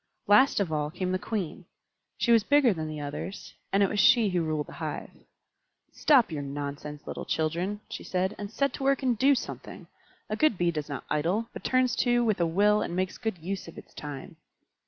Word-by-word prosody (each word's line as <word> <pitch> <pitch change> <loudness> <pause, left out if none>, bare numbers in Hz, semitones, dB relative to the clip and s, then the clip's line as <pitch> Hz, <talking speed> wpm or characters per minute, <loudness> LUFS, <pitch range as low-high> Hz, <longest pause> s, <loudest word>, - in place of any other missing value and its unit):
Last 210 +6 +5
of 180 -6 -1
all 150 -1 0
came 180 +3 -3
the 185 - 0
Queen. 190 -5 -4 0.5
She 235 - +1
was 230 -2 +6
bigger 285 -3 +4
than 160 -3 -4
the 155 -1 -5
others, 145 +7 -6 0.2
and 195 +1 +4
it - - +4
was 210 - -2
she 220 0 +6
who 180 -2 0
ruled 155 -2 -1
the - - -12
hive. - - -4 0.8
"Stop 265 - +4
your 150 -2 -3
nonsense, 145 +1 -6
little - - -5
children," 175 +6 -1
she - - -7
said, 185 +2 -1
"and 205 -1 -5
set 275 +4 0
to - - -5
work 275 0 +2
and 250 -2 +2
do 275 +5 +4
something. - - -6 0.4
A 215 - -2
good 305 -3 +2
Bee 175 -1 +2
does 150 -2 -4
not 140 - -5
idle, 175 +10 0
but - - -8
turns 255 -1 +2
to 240 -1 +3
with 215 -5 +1
a 170 - +3
will 205 +5 +3
and 175 - -3
makes 185 0 -2
good 220 -5 -2
use 185 +4 -5
of 165 - -11
its - - -12
time." 145 -3 -8
190 Hz, 215 wpm, -28 LUFS, 155-230 Hz, 0.8 s, was